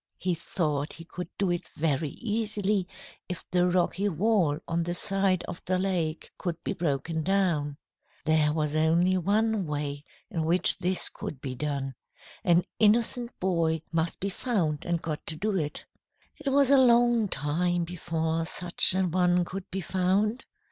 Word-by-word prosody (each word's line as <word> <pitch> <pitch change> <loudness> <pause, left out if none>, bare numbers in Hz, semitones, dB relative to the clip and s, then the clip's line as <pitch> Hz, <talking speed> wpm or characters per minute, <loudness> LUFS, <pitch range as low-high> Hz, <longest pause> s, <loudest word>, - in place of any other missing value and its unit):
He 180 -1 -1
thought 150 -3 -2
he 165 - -9
could 175 +1 -7
do 195 -3 +1
it 175 - -3
very 150 -1 0
easily 210 - -2 0.4
if 180 - -6
the 180 0 +3
rocky 185 +3 +1
wall 180 -4 +1
on 170 0 0
the 175 +1 -1
side 195 -1 +2
of 175 - -8
the 185 0 +1
lake 175 -4 -2
could 175 -3 -2
be - - -2
broken 160 0 -2
down. 165 -6 0 0.5
There 155 -1 +3
was 150 -1 -1
only 165 +4 +3
one 210 +1 +1
way 145 -1 -4 0.3
in 165 -5 -1
which 170 +3 +6
this 185 0 +2
could 140 - -6
be 130 -1 -5
done. 140 0 -3 0.5
An 175 -3 +4 0.2
innocent 235 +3 +2
boy 165 -4 0
must 165 0 -1
be 200 - -2
found 180 - -1
and 170 -1 -1
got 155 -2 -4
to 160 - -3
do 205 +5 -1
it. 150 -5 -3 0.5
"It 295 -2 -4
was 275 0 +3
a 275 - +7
long 240 -3 +4
time 175 +3 0
before 165 -1 -2
such 175 +1 +4
an 185 -2 +1
one 180 0 +2
could 190 +1 -7
be 195 - -4
found. 190 +6 0
175 Hz, 160 wpm, -27 LUFS, 160-195 Hz, 0.5 s, a